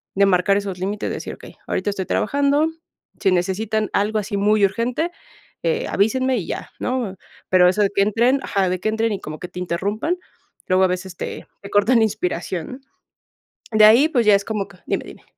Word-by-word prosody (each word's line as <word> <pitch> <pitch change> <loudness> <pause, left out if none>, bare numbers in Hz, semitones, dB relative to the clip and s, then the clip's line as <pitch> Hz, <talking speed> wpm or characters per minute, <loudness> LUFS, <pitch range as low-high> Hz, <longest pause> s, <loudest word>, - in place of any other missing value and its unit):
de 200 +1 +5
marcar 195 +1 +3
esos 195 -3 -4
límites, 200 +3 -2
decir, - - -5
okey, - - -14
ahorita 185 - -1
estoy 190 -2 -4
trabajando, 285 - +1 0.5
si 195 -3 +3
necesitan 205 +4 0
algo 215 +2 +1
así 205 0 -3
muy 210 +1 +3
urgente, 240 - -1 0.5
eh, 485 0 0
avísenme 255 +5 +1
y 175 - -4
ya, - - -5
¿no? 245 -6 -2 0.3
Pero 180 -1 +6
eso 200 +3 +1
de 200 - +2
que 200 - +3
entren 235 +6 +2
ajá. 195 -3 0
De 185 0 -1
que 215 - -3
entren 220 +1 0
y 200 - -3
como 155 0 -7
que 180 - -6
te - - -8
interrumpan, 200 - -1 0.5
luego 185 +1 +3
a - - +3
veces 180 0 -4
te - - -6
te 200 - -9
cortan 205 +5 +3
la - - +4
inspiración. 185 +1 -3 0.9
De 215 -1 +5
ahí, 235 +8 +7
pues, 245 -7 +1
ya 210 - +6
es 200 0 -1
como 210 -3 -2
que 195 - -17
dime, - - -1
dime. - - -13
205 Hz, 200 wpm, -21 LUFS, 190-230 Hz, 0.9 s, ahí